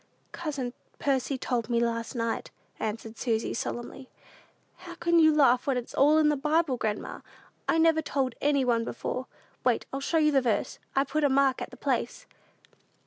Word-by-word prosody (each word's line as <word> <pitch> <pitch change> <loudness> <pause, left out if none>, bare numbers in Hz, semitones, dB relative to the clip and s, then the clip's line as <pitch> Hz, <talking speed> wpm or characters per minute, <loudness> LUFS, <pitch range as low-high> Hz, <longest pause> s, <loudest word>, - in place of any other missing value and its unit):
"Cousin 280 -7 -4 0.2
Percy 270 -1 0
told 240 -3 -2
me 235 -1 +2
last 230 +1 -1
night," 230 -1 -2 0.3
answered 220 +1 -4
Susy, 225 -3 0
solemnly. 240 +2 -5 0.7
"How 350 -1 -10
can 340 0 +3
you 315 -1 +7
laugh 270 -4 +4
when 270 -2 +2
it's 245 - -5
all 295 +3 +5
in 310 -1 +4
the 300 - +2
Bible, 300 0 +1
grandma? 215 -3 -3 0.5
I - - +3
never 325 -1 +4
told 270 -4 -1
anybody 260 -5 +2
before. 255 +2 -4 0.4
Wait; - - +1
I'll 270 - -2
show 300 +4 0
you 305 -1 +4
the 275 -2 +4
verse. 225 -5 -1 0.2
I've 275 0 +2
put 310 0 0
a 285 - +4
mark 270 -1 +3
at - - -4
the - - -13
place." - - -2
270 Hz, 175 wpm, -28 LUFS, 240-300 Hz, 0.7 s, you